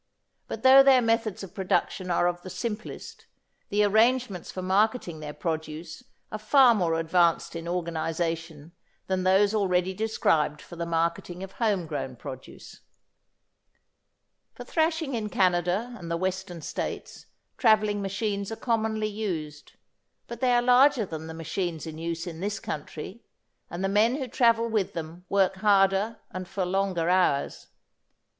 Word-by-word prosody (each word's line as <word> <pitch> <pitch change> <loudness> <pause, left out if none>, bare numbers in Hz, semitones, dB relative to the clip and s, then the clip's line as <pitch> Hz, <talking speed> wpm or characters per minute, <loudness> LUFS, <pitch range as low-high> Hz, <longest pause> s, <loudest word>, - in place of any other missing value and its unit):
But 225 - -6
though 265 +1 +9
their 270 -1 +6
methods 225 -3 0
of 190 -1 -9
production 190 -1 -1
are 175 0 +2
of 175 0 -2
the 185 - -9
simplest, 210 +4 -6 0.4
the 210 +1 +2
arrangements 220 -2 +2
for 185 - -5
marketing 195 -2 +1
their 150 -1 -6
produce 160 +4 -5 0.3
are 215 - -4
far 250 +3 +6
more 175 -6 +1
advanced 170 0 +2
in 165 0 -6
organisation 165 -2 -3 0.3
than 190 -1 -1
those 195 +3 +3
already 185 -3 +1
described 165 -8 +1
for 175 - -12
the 170 0 -4
marketing 170 +2 -2
of 190 - -8
home 205 -5 0
grown 145 -4 -5
produce. 130 +2 -10 1.8
For - - -8
thrashing 320 -3 0
in 220 -3 -2
Canada 185 +5 +1
and 170 -7 -9
the 170 - -1
Western 185 -2 -4
States, - - -5 0.3
travelling 215 -3 +3
machines 200 +1 -2
are - - -3
commonly 220 -2 -1
used, 175 -9 -5 0.5
but 235 - -9
they 250 -1 +3
are 240 0 +3
larger 250 -1 +5
than 160 -3 -7
the 160 - -7
machines 165 0 -3
in 160 -1 -7
use 165 0 -3
in 165 -2 -7
this 205 +2 -3
country, 155 +8 -7 0.5
and 175 +2 -5
the - - +2
men 215 +5 +3
who 270 -2 -3
travel 230 -2 +3
with 215 -4 -1
them 165 +2 -7
work 195 -1 +2
harder 200 +2 +3
and 185 -1 -6
for 190 0 -2
longer 185 -2 0
hours. 180 -6 +1
190 Hz, 150 wpm, -27 LUFS, 170-220 Hz, 1.8 s, though